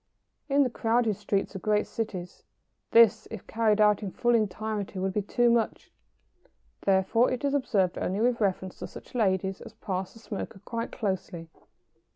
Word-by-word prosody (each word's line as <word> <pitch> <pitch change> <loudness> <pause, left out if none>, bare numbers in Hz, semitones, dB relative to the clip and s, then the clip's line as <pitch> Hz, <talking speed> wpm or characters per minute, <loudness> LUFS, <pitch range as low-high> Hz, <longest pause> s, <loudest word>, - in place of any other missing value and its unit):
In 280 +1 +4
the 255 - 0
crowded 225 -2 +1
streets 195 +1 -2
of 190 - -6
great 210 0 +2
cities 185 -6 -5 0.5
this, 225 -1 +5
if 220 -4 -8
carried 220 -2 +1
out 210 -1 +4
in 200 - -3
full 240 +5 +1
entirety, 215 -2 -1
would 190 0 -1
be 210 - +1
too 240 +4 +2
much. 230 -2 0 0.9
Therefore 195 +5 +3
it 255 +3 -2
is 280 - +1
observed 200 -10 +1
only 190 +3 -1
with 240 +1 +1
reference 190 -2 -1
to - - -5
such - - -12
ladies 190 -4 0
as - - -11
pass 190 -1 -4
the 225 - -14
smoker 205 -3 -6
quite 230 -1 -4
closely. 185 -5 -4
210 Hz, 170 wpm, -28 LUFS, 190-230 Hz, 0.9 s, this